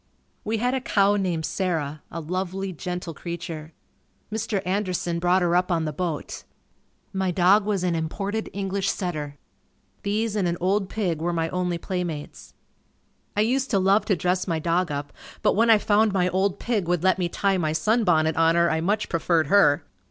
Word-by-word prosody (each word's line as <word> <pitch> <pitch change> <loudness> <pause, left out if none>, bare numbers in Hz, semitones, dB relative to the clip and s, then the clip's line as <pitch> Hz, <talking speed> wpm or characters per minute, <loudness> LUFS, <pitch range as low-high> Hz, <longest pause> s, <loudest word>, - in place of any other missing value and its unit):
We 220 +1 -1
had 245 +3 0
a 265 - -1
cow 200 -4 +3
named 180 -5 -1
Sarah. 155 -6 -2
A 165 - -5
lovely, 185 +3 -3
gentle 180 0 -5
creature. 165 -2 -6 0.6
Mr. 220 -2 -1
Anderson 180 -3 -1
brought 180 +1 +3
her 175 0 +2
up 180 +1 +2
on 165 -2 +1
the 155 - -3
boat. 165 -1 -4 0.7
My 190 -1 0
dog 190 +4 +4
was 200 -3 0
an 180 -1 +1
imported 195 +7 -3
English 195 0 -2
setter. 150 -8 -3 0.6
These 215 +2 -1
and 195 -4 +1
an 170 0 -1
old 195 +2 +1
pig 175 -8 -2
were 175 +1 0
my 165 -1 -1
only 180 -1 -1
playmates. 170 -4 -5 0.8
I - - +4
used 260 +5 +1
to 205 - +2
love 195 +2 +3
to 200 - +2
dress 180 +3 0
my 165 -2 0
dog 170 +2 0
up 145 0 -4 0.3
but - - +4
when 230 +3 +3
I 225 - +8
found 210 0 +2
my 180 -2 +2
old 190 +1 0
pig 210 -7 -1
would 175 -1 0
let 190 0 +3
me 175 -1 0
tie 195 +2 +1
my 155 -3 0
sunbonnet 160 -3 +2
on 165 0 +3
her 170 -1 +3
I 160 - 0
much 205 +5 0
preferred 165 -1 +1
her. 165 -7 +5
180 Hz, 185 wpm, -24 LUFS, 165-200 Hz, 0.8 s, I